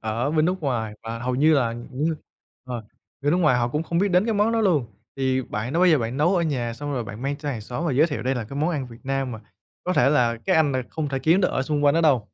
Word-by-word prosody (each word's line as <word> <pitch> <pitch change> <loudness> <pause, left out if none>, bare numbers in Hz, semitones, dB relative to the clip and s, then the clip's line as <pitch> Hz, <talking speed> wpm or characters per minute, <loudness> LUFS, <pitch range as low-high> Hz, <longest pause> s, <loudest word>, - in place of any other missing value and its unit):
ở 115 +6 -1
bên 155 -1 +2
nước 185 +2 0
ngoài 115 -6 -2
và 115 0 -5
hầu 125 +1 -2
như 155 +4 +4
là 120 -5 +2
những 130 +7 -3 0.5
ờ, 125 -3 -5 0.4
bên 145 +1 +1
nước - - +3
ngoài 150 -8 +3
họ 120 0 +1
cũng 150 +5 -1
không 170 +1 -2
biết 200 +2 +2
đến 180 +3 +4
cái 225 -2 0
món 210 +3 +2
đó 230 - +1
luôn. 165 - +2 0.3
Thì 130 -1 0
bạn 110 +3 -4
đã 165 - 0
bao 185 - +5
giờ 155 -4 +5
bạn 115 +2 -3
nấu 175 +6 +3
ở 170 - +2
nhà 125 -7 -1
xong 145 +4 -5
rồi 125 -4 -2
bạn 110 +3 -8
mang 140 +1 -1
cho 145 -1 -6
hàng 120 -6 -3
xóm 125 +10 -5
và 145 - 0
giới 150 +6 +4
thiệu 145 - -4
đây 130 +2 0
là 120 - -3
cái 135 +6 -8
món 155 +4 +1
ăn 140 -6 -2
Việt 115 -1 -13
Nam 135 -2 -1
mà 110 - -7 0.4
có 180 - 0
thể 140 - +4
là 120 -5 +2
cái 115 +7 0
anh 150 -3 +3
này 130 -1 0
không 155 -2 -3
thể 135 -1 -2
kiếm 165 +7 +3
nó - - +3
ở 130 - -1
xung 145 +1 -1
quanh 145 - +5
đó 165 - +3
đâu? 145 -8 +3
140 Hz, 310 wpm, -24 LUFS, 120-160 Hz, 0.5 s, bao